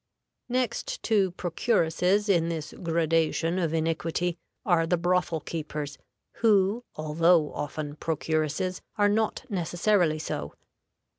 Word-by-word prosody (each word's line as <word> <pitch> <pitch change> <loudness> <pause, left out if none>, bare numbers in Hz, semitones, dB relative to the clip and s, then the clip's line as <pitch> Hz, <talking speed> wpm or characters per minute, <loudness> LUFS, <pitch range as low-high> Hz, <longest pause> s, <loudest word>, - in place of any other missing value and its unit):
Next 255 - -2
to 205 -4 +3
procuresses 180 +2 +1
in 170 -4 +3
this 160 -2 -4
gradation 165 +1 +1
of 165 -4 0
iniquity 165 +2 -1 0.3
are 165 -3 +3
the 175 - +2
brothel 175 -2 +1
keepers, 150 -2 -5 0.4
who, 210 +1 +3
although 155 +1 +3
often 145 0 -5
procuresses, 160 +3 -1 0.2
are 205 -1 +4
not 220 +4 0
necessarily 175 -3 +1
so. 70 - -5
170 Hz, 105 wpm, -27 LUFS, 160-190 Hz, 0.4 s, are